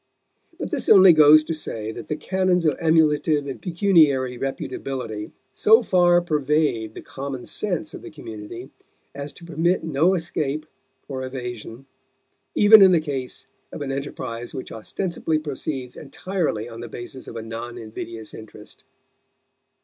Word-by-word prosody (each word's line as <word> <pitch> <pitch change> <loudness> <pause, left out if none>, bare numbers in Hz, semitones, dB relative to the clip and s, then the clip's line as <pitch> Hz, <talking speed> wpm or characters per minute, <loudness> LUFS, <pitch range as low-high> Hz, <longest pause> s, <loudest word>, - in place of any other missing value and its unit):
But - - -5
this 295 -5 -2
only 190 -3 +9
goes 155 0 +7
to 165 - -3
say 110 -8 -5
that 115 0 -9
the 150 - -2
canons 180 +2 0
of 155 - +3
emulative 155 -3 +3
and 135 - -6
pecuniary 160 -8 +3
reputability 130 -5 -4 0.2
so 220 - +5
far 175 -3 +4
pervade 150 -8 0
the - - -8
common 135 -2 -6
sense 180 -6 -2
of - - -8
the - - -9
community 115 -2 -9 0.4
as 140 +1 -6
to 170 - -13
permit 170 +2 0
no 160 +5 +2
escape 155 -3 -2 0.4
or 130 -2 -5
evasion, 125 -1 -7 0.7
even 210 +1 +8
in 190 -1 +8
the 170 - +5
case 140 -5 -5 0.3
of 150 - -5
an 135 - -4
enterprise 120 -4 -5
which 130 - -6
ostensibly 160 - -2
proceeds 135 -4 -5
entirely 155 - -3
on 115 -1 -9
the 120 0 -7
basis 120 +3 -8
of - - -9
a 115 - -5
non 115 +2 -7
invidious 110 0 -8
interest. 110 -1 -12
145 Hz, 150 wpm, -23 LUFS, 120-165 Hz, 0.7 s, only